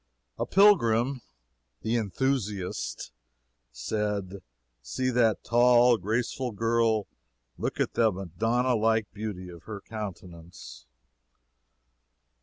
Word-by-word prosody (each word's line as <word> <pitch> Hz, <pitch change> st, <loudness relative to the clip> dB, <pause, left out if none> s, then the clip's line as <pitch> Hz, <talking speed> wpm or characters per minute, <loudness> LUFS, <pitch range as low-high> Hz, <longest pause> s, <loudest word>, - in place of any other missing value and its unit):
A -, -, -1 dB
pilgrim 135 Hz, -, +4 dB, 0.6 s
the 110 Hz, +2 st, 0 dB
"Enthusiast" 105 Hz, -3 st, -2 dB, 0.6 s
said: 100 Hz, -, -3 dB, 0.4 s
"See 130 Hz, -, -2 dB
that 115 Hz, -3 st, +2 dB
tall, 120 Hz, 0 st, +5 dB
graceful 115 Hz, +5 st, -2 dB
girl! 115 Hz, -1 st, +1 dB, 0.5 s
look -, -, -3 dB
at -, -, 0 dB
the 115 Hz, -2 st, +3 dB
Madonna 115 Hz, +8 st, -1 dB
like 110 Hz, -1 st, +1 dB
beauty 105 Hz, -4 st, -6 dB
of 85 Hz, -1 st, -13 dB
her 105 Hz, -2 st, -6 dB
countenance!" 90 Hz, -, -9 dB
110 Hz, 90 wpm, -27 LUFS, 95-120 Hz, 0.6 s, tall